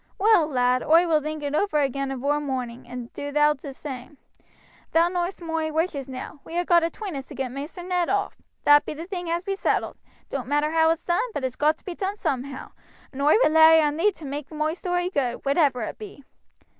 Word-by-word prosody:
Well, 415 -6 +4
lad, 250 -3 +2
oi 330 +3 +5
will 315 -3 +2
think 305 0 -5
it 285 0 -3
over 310 0 +1
agin 275 -1 0
avore 280 +3 -1
moorning, 250 -4 -4
and 245 -1 -8
do 285 0 -5
thou 295 +1 +4
do 285 0 -12
t' - - -5
same. 265 0 -8 0.8
Thou 335 +1 +4
know'st 355 0 -3
moi 325 -1 -2
wishes 305 -4 -2
now. 260 +3 -7
We 335 - -6
ha' 350 - +1
got 345 -1 +5
atween 355 +2 -4
us 270 -1 -6
to - - -10
get 265 -2 -3
Maister 290 +7 -7
Ned 360 -1 0
off 400 0 0 0.3
that 290 0 +6
be - - -6
the 325 +3 -7
thing 355 -2 -5
as 340 +1 -1
be 390 +1 -2
settled. - - -1 0.3
It - - -40
doan't 255 -4 -4
matter 295 +2 +1
how 320 0 +4
it's 325 0 -1
done, 345 0 +2
but 290 - -3
it's 255 -1 -2
got 305 +1 +2
to - - -29
be 365 - -4
done 385 +3 -3
soomhow; 270 -7 -4 0.4
and 275 0 -6
oi 295 +2 +5
rely 320 -1 +7
on 300 -1 +2
thee 405 +6 +3
to 325 - -11
maake 285 +1 -5
moi 310 0 -1
story 355 0 -2
good, 255 -7 -2
whatever 275 -4 +2
it - - -6
be. 400 -9 -10
300 Hz, 230 wpm, -25 LUFS, 275-345 Hz, 0.8 s, rely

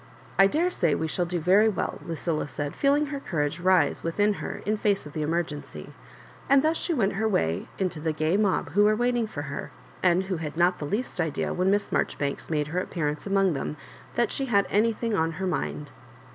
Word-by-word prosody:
"T 195 - +8
daresay 300 - +1
we 160 - -1
shall 175 +2 -1
do 175 0 -2
very 195 +7 +5
well," 205 - -3
Lucilla 165 -2 -2
said, 145 0 -4
feeling 285 +1 +3
her 280 - -3
courage 150 - -2
rise 185 +1 +3
within 205 +5 +1
her - - -5
in 210 +2 +1
face 205 -4 0
of 145 - -10
the 155 - -3
emergency; 155 -1 -3 0.6
and 275 0 +5
thus 315 +1 +2
she 345 - -2
went 215 -11 +1
her 220 +3 0
way 85 - 0
into 185 -4 -2
the 160 +1 -1
gay 155 +3 0
mob 200 -7 +1
who 205 +7 +3
were 215 0 +4
waiting 240 0 +1
for 145 -9 -5
her, 140 -1 -5 0.3
and 180 0 +3
who 190 -2 -3
bad 160 -1 -5
not 175 +1 +3
the 150 - -3
least 205 - -2
idea 160 -3 -1
w^ben 180 +1 0
Miss 200 +1 +2
Marjori - - 0
banks 140 -1 -3
made 150 -2 0
her 175 +4 -1
appearance 155 -3 -3
among 195 -2 +3
them 145 +1 -4 0.4
that 235 -2 +1
she 270 - -1
had 200 -6 +3
anything 225 +2 +1
on 165 -4 +1
her 190 +4 -4
mind. 75 - -3
180 Hz, 215 wpm, -26 LUFS, 155-210 Hz, 0.6 s, T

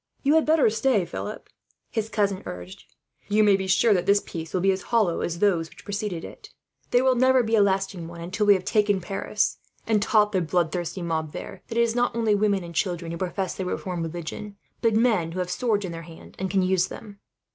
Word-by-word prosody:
"You 285 +1 +4
had 320 -1 +3
better 315 -4 +5
stay, 220 -3 +2
Philip," 205 +5 -6 0.4
his 220 -2 -2
cousin 200 -3 0
urged. 90 +1 -8 0.4
"You 215 +1 +3
may 205 -2 +5
be 190 0 -2
sure 200 +4 +4
that 180 -1 0
this 200 0 +5
peace 165 -1 -6
will 185 - 0
be 195 +1 +4
as 190 0 -2
hollow 215 -8 +2
as 170 0 -2
those 170 -4 +1
which - - -17
preceded 205 -4 -3
it. - - -12 0.4
There 245 +1 +3
will 260 0 +4
never 255 0 +4
be 225 0 -3
a 215 - +5
lasting 195 -3 0
one 170 0 -10
until 195 +5 -2
we 205 - +8
have 185 -1 -4
taken 205 -2 +2
Paris, 195 +3 -1 0.3
and 215 -2 +2
taught 210 -1 +3
the 190 -3 +1
bloodthirsty 175 +1 -1
mob 160 -2 -2
there - - -8
that 230 - -5
it - - +5
is 235 -1 +2
not 245 -1 +1
only 225 -2 +2
women 200 -2 +1
and 170 0 -9
children 170 -1 -2
who 170 - -4
profess 185 0 -2
the 190 - -4
reformed 180 -1 -3
religion, 175 +5 -6 0.3
but 230 -2 +2
men 215 -8 +2
who 185 - -4
have 180 0 -2
swords 210 -2 0
in 180 - -5
their 165 0 -6
hands 165 0 -13
and 190 0 -2
can 190 -1 +2
use 185 0 +2
them." 205 -1 -10
195 Hz, 230 wpm, -25 LUFS, 175-215 Hz, 0.4 s, we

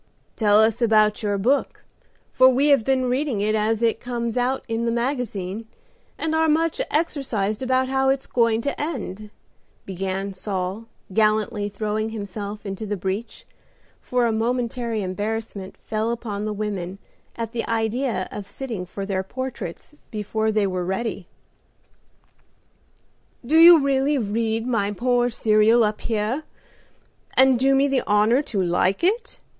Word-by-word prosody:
"Tell 210 -2 +4
us 225 +2 +3
about 215 -2 +3
your 205 -2 0
book, 255 +8 0 0.5
for 260 0 +7
we 270 +3 +3
have 280 -5 +5
been 260 +1 +1
reading 255 -2 0
it 210 +1 +1
as 220 +1 +1
it 230 -1 +2
comes 235 -2 -3
out 250 +2 0
in 230 0 -1
the - - +1
magazine, 230 -5 -3 0.5
and 320 0 -2
are 320 0 +3
much 330 +8 +1
exercised 255 -10 -1
about 260 0 +1
how 265 0 +1
it's 270 0 0
going 230 -2 +2
to 280 +3 -3
end," 215 - -5 0.6
began 195 +1 -3
Saul, 190 +2 -4 0.3
gallantly 215 -1 +1
throwing 215 +1 -2
himself 205 -1 -6
into 195 +2 -5
the 205 0 -2
breach, 190 +5 -4 0.6
for 250 -1 0
a 230 - +2
momentary 235 -1 -1
embarrassment 205 +1 -4
fell 215 +1 -1
upon 215 -3 -3
the 215 - -2
women 200 -3 -4 0.4
at 230 -1 -4
the 235 -1 -2
idea 225 -2 -1
of 205 -1 -7
sitting 215 -4 -6
for 195 +2 -6
their 195 -1 -1
portraits 245 - -6 0.2
before 220 0 -1
they 215 -1 +2
were 185 -2 -2
ready. 190 0 -3 2.2
"Do 295 +6 +1
you 335 0 +10
really 275 +1 +2
read 225 0 -1
my 225 -5 0
poor 245 +3 +1
serial 220 +1 +4
up 210 0 -1
here, 225 +5 -1 1.0
and 260 -2 +5
do 270 +1 +4
me 275 +1 +4
the 270 -2 +1
honor 210 +5 +4
to 210 -10 -2
like 180 - +1
it?" 455 +7 0
225 Hz, 150 wpm, -23 LUFS, 205-255 Hz, 2.2 s, you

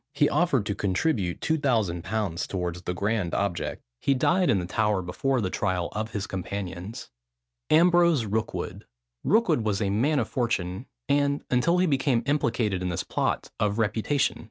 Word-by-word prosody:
He 145 - +4
offered 145 - +2
to 100 - -1
contribute 100 - 0
2000_l._ 110 - 0
towards 90 -2 -3
the 90 - -3
grand 100 -3 -1
object. 100 -4 -2 0.2
He 140 - +2
died 180 +7 +2
in 110 - +4
the 90 - -2
Tower 105 0 0
before 130 +9 0
the 95 -3 -2
trial 95 -4 -1
of 110 +1 -3
his 105 -3 -3
companions. 95 +1 -6 0.6
AMBROSE 170 -5 +5
ROOKWOOD. 110 +2 -3 0.4
Rookwood 220 - +3
was 105 -2 0
a 100 -3 0
man 135 +9 +2
of 125 - +1
fortune, 105 -3 -2 0.2
and, 140 0 +1
until 145 +8 +3
he 180 - +3
became 135 -6 +1
implicated 115 -9 0
in 90 - -1
this 85 - -2
plot, - - -2
of 105 0 +1
reputation. 115 +6 +1
110 Hz, 155 wpm, -26 LUFS, 95-140 Hz, 0.6 s, AMBROSE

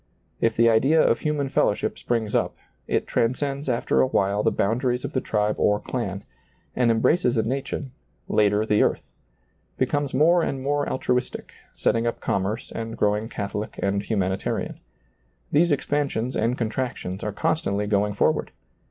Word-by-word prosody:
If 115 -1 +1
the 115 +1 +4
idea 130 +8 +4
of - - +3
hu 150 - 0
man 145 -2 -1
fellowship 105 - 0
springs 115 -3 -1
up, - - +1 0.3
it - - 0
transcends 135 +4 -1
after 120 -1 +2
a - - +3
while 100 -4 +1
the - - +3
boundaries 125 +4 0
of - - -5
the 130 - 0
tribe 105 -2 0
or 105 0 +3
clan, 100 -6 -4 0.5
and 125 -2 +3
embraces 120 +3 +2
a 110 - +3
nation, 135 +2 -3 0.4
later 105 0 +2
the 105 -1 +3
earth; - - +1 0.7
becomes 145 +2 0
more 165 +6 +4
and 135 -4 -2
more 145 +1 0
altruistic, 125 -1 -2 0.2
setting 115 0 +1
up 115 - -2
commerce 100 +4 -2
and 115 0 -5
growing 105 +2 +1
catholic 105 0 -5
and 100 0 +1
humanitarian. 95 -3 -2 0.7
These 170 +3 +4
ex 145 - 0
pansions 140 -4 -1
and 120 +3 0
contractions 115 -5 -3
are 105 - -2
constantly 105 -6 0
going 105 0 +1
forward. - - +1
115 Hz, 160 wpm, -24 LUFS, 105-135 Hz, 0.7 s, the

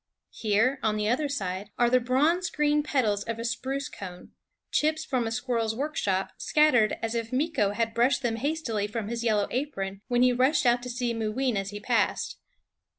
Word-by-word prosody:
Here, 225 +5 +1
on 215 -1 +1
the 210 0 0
other 280 +6 +1
side, 200 -6 -3
are 240 - +4
the 255 +1 +4
bronze 295 +9 +2
green 300 0 +2
petals 225 -9 0
of 230 -1 -3
a 230 - -5
spruce 270 +4 -2
cone, 180 -2 -9 0.4
chips 310 +1 +1
from 255 -6 0
a - - -3
squirrel's 230 -2 -1
workshop, 215 -9 -1
scattered 255 -8 +3
as 225 0 -1
if 230 -1 -2
Meeko 255 -7 +1
had 230 0 0
brushed 250 +4 +2
them 230 -2 0
hastily 245 -6 -1
from 215 -1 -4
his 235 0 -3
yellow 215 -3 +2
apron 200 -8 -3
when 245 0 +3
he 250 0 +5
rushed 260 +5 +2
out 240 0 +4
to 250 - -6
see 245 -1 -1
Mooween 225 +3 -1
as 195 0 -2
he 205 0 -6
passed. 235 +3 0
240 Hz, 190 wpm, -27 LUFS, 215-270 Hz, 0.4 s, he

